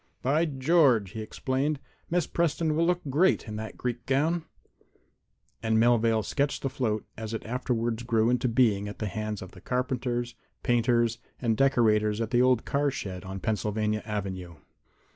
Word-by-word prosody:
"By 150 +6 +3
George!" 135 - +3
he 110 0 -5
exclaimed. 135 +6 -1 0.3
"Miss 175 +1 +1
Preston 165 -2 0
will 165 +1 +2
look 180 0 +1
great 170 +2 +3
in 105 - -5
that 110 0 -6
Greek 120 -1 -4
gown." 155 +5 +1 1.2
And 110 -1 +1
Melvale 115 -2 +3
sketched 140 +4 -1
the 135 - -1
float 110 -5 -1
as 110 0 -5
it - - -6
afterward 120 -1 -2
grew 115 -1 +3
into 125 0 +1
being 110 -4 +2
at 105 - -7
the 110 - -3
hands 105 0 -4
of 95 - -11
carpenters, 125 -1 -1 0.3
painters 120 -1 +2 0.2
and 115 -3 +1
decorators 110 -5 +3
at 115 0 -2
the 120 -1 +4
old 125 -2 +3
car 145 +1 +1
shed 95 -8 -5
on 95 0 -6
Pennsylvania 105 -1 -1
avenue. 95 -5 -4
120 Hz, 160 wpm, -28 LUFS, 110-135 Hz, 1.2 s, the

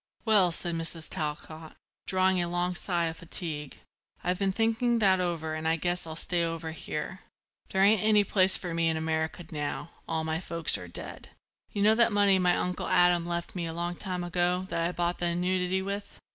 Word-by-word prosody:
"Well," 205 -6 +5
said 170 +1 -2
Mrs. 165 -1 -1
Talcott, 155 -1 -5 0.3
drawing 185 -1 +2
a 175 - -1
long 175 +1 0
sigh 175 -1 -1
of 160 0 -3
fatigue, 160 -4 -4 0.5
"I've 180 0 0
been 195 -1 +2
thinking 225 +3 +1
that 190 -4 +4
over 165 -3 -2
and 155 0 -3
I 160 - +3
guess 175 +1 -2
I'll 160 - -6
stay 170 +1 0
over 165 -1 -3
here. 160 +3 -5 0.5
There 190 0 +2
ain't 210 +1 +5
any 215 -1 +4
place 190 -1 +3
for 175 -2 -5
me 165 0 +2
in 160 - 0
America 160 +2 -2
now; 150 +2 -4 0.2
all 160 -1 -1
my 160 0 -1
folks 170 -3 +2
are 90 - -5
dead. 85 - -7 0.4
You 200 - -1
know 215 +1 +6
that 235 +1 +4
money 200 -2 +4
my 180 -1 +3
Uncle 180 0 -2
Adam 175 -1 +4
left 170 +1 -3
me 170 -2 -2
a 165 - -5
long 175 +1 -3
time 180 -1 -3
ago 175 +1 0
that 165 0 0
I - - -2
bought 175 0 -1
the 175 - +1
annuity 180 +2 0
with. 200 +1 -5
175 Hz, 200 wpm, -28 LUFS, 165-190 Hz, 0.5 s, know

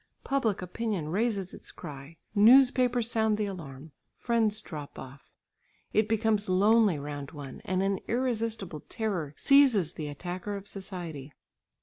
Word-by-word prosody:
Public 230 -9 0
opinion 185 -4 -3
raises 200 0 -1
its - - -8
cry, 140 +3 -10 0.2
newspapers 245 +1 +5
sound 220 -2 +2
the 210 - 0
alarm, 155 -6 -8 0.2
friends 225 -3 +1
drop 150 -8 -8
off, 135 +2 -11 0.6
it 215 0 +3
becomes 220 -2 +1
lonely 205 0 +4
round 145 -1 -6
one, 145 -3 -8
and 185 0 0
an 195 -1 0
irresistible 225 -8 -2
terror 180 -10 -3
seizes 265 - +4
the 155 - -5
attacker 180 +7 -5
of 200 0 -7
society. 175 -8 -7
200 Hz, 130 wpm, -29 LUFS, 155-225 Hz, 0.6 s, newspapers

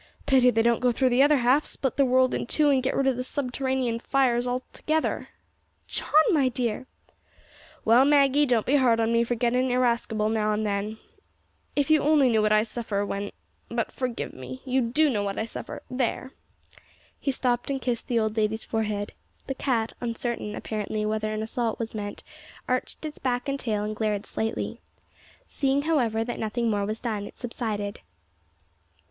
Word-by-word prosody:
Pity 260 -2 +5
they 225 -2 +2
don't 235 0 +3
go 250 0 +3
through 255 +2 +2
the 250 +2 +3
other 290 +1 +5
half, 260 +4 +3
split 265 -3 -2
the 280 - +4
world 255 0 +3
in - - -2
two, 295 +1 +3
and 265 -2 +3
get 260 - -1
rid 275 - +1
of 265 -2 +2
the 250 - -2
subterranean 260 -2 -1
fires 250 -2 +1
altogether." 260 +5 -2 0.6
"John, - - -3 0.2
my 280 -7 +3
dear!" 245 0 -2 1.0
"Well, 235 +4 +6
Maggie, 285 0 +4
don't 235 -4 +2
be 285 +3 +3
hard 240 -4 +3
on 225 0 +1
me 230 0 +4
for 240 +1 -1
gettin' 250 +2 +1
irascible 235 -3 +1
now 215 -1 +1
and 215 +1 -1
then. 205 +1 -2 0.8
If 290 +1 +1
you 310 - +5
only 290 -3 +4
knew 220 -2 +3
what 215 0 +2
I 215 0 +5
suffer 220 -3 -3
when 200 0 -4 0.4
but - - -2
forgive 250 -3 -4
me. 130 0 -9
You 260 0 +1
do 260 +7 +2
know 225 -8 0
what 200 -1 -3
I 220 - -1
suffer 225 - -7
there!" 255 +1 -2 0.9
He - - -2
stooped 245 -2 0
and 275 -1 -1
kissed 245 -2 -2
the 240 - 0
old 220 -1 0
lady's 220 0 0
forehead. 210 -2 -2 0.3
The 270 - -3
cat, 235 -4 -1
uncertain, 230 -2 -3
apparently, 215 0 -3
whether 215 0 -1
an 215 0 -2
assault 225 0 -2
was 230 -1 -4
meant, 205 -2 -5 0.4
arched 255 +4 -2
its 305 -1 -6
back 250 0 -1
and 275 0 -1
tall, 215 -5 -1
and 215 0 -3
glared 210 -1 -1
slightly. 225 0 -3 0.6
Seeing 275 0 0
however 240 -9 +1
that 240 +1 -5
nothing 225 +1 -1
more 200 -1 0
was 215 +1 -4
done, 215 -4 -3
it - - -14
subsided. 215 -4 -4
240 Hz, 185 wpm, -26 LUFS, 220-260 Hz, 1.0 s, Well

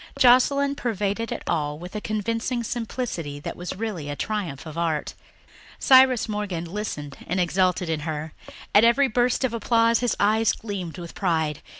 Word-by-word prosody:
Joscelyn 275 +3 +5
pervaded 220 -2 -2
it - - -4
all 150 -1 -1
with 180 +5 -10
a 210 - -3
convincing 230 +3 -2
simplicity 225 - -4
that - - -5
was 175 0 -6
really 205 -9 -4
the 145 - -3
triumph 185 -8 -3
of 155 -1 -8
art. 165 -3 -1 0.6
Cyrus 260 -3 +5
Morgan 205 -6 -3
listened 165 -7 -5
and 180 +3 -1
exulted 180 0 +1
in 160 -1 -1
her; 155 0 -5 0.4
at 205 - +7
every 235 +4 +5
burst 245 +2 +1
of 255 -3 0
applause 230 0 +3
his 245 -2 0
eyes 220 +2 +3
gleamed 190 -6 -6
with 170 -1 -8
pride. 160 -5 0
205 Hz, 165 wpm, -24 LUFS, 165-230 Hz, 0.6 s, at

